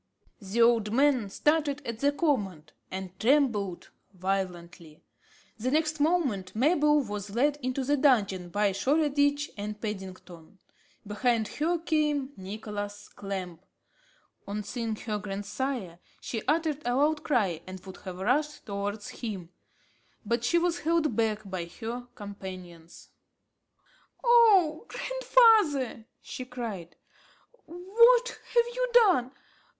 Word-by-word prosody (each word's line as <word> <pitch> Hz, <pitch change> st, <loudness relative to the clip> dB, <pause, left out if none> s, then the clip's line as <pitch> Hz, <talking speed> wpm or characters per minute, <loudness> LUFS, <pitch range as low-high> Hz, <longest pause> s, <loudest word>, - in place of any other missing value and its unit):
The 205 Hz, +4 st, +1 dB
old 230 Hz, -3 st, +3 dB
man 260 Hz, -4 st, +2 dB
started 295 Hz, +3 st, +1 dB
at 230 Hz, -1 st, -5 dB
the 285 Hz, +2 st, +3 dB
command, 210 Hz, -, -1 dB, 0.2 s
and 190 Hz, -1 st, -7 dB
trembled 225 Hz, -8 st, +1 dB, 0.2 s
violently. 175 Hz, -4 st, -4 dB, 0.6 s
The 245 Hz, +4 st, -1 dB
next 310 Hz, +2 st, 0 dB
moment, 270 Hz, -, 0 dB
Mabel 295 Hz, +3 st, +3 dB
was 205 Hz, -3 st, -5 dB
led 290 Hz, +4 st, +2 dB
into 255 Hz, +1 st, -2 dB
the 290 Hz, +3 st, +1 dB
dungeon 200 Hz, -10 st, +2 dB
by 205 Hz, +2 st, +1 dB
Shoreditch 285 Hz, +5 st, +1 dB
and 210 Hz, +1 st, -5 dB
Paddington. 190 Hz, -4 st, -8 dB, 0.5 s
Behind 220 Hz, +1 st, 0 dB
her 335 Hz, +4 st, 0 dB
came 300 Hz, -4 st, 0 dB
Nicholas 205 Hz, +1 st, -6 dB
Clamp. 185 Hz, -4 st, -6 dB, 0.8 s
On 210 Hz, +1 st, -3 dB
seeing 230 Hz, 0 st, -3 dB
her 210 Hz, -1 st, -4 dB
grandsire, 200 Hz, -1 st, -4 dB, 0.2 s
she 225 Hz, -, -4 dB
uttered 310 Hz, -1 st, +1 dB
a 245 Hz, 0 st, 0 dB
loud 295 Hz, +3 st, +2 dB
cry 200 Hz, -, +1 dB
and 185 Hz, 0 st, -7 dB
would 190 Hz, -1 st, -9 dB
have 185 Hz, -1 st, -8 dB
rushed 290 Hz, +10 st, 0 dB
towards 205 Hz, 0 st, -4 dB
him, 195 Hz, -8 st, -6 dB, 0.8 s
but 235 Hz, +2 st, 0 dB
she 345 Hz, -, +2 dB
was 345 Hz, 0 st, +1 dB
held 320 Hz, -6 st, +1 dB
back 215 Hz, -2 st, 0 dB
by 185 Hz, -3 st, -4 dB
her 235 Hz, +7 st, -7 dB
companions. 185 Hz, -5 st, -10 dB, 1.1 s
"Oh 435 Hz, -8 st, +5 dB
grandfather!" 435 Hz, -, +3 dB, 0.2 s
she 255 Hz, -, -6 dB
cried, 230 Hz, -9 st, -6 dB, 0.7 s
"what 465 Hz, +9 st, +4 dB
have 475 Hz, 0 st, 0 dB
you -, -, -1 dB
done? 370 Hz, -, +5 dB
235 Hz, 120 wpm, -28 LUFS, 200-295 Hz, 1.1 s, Oh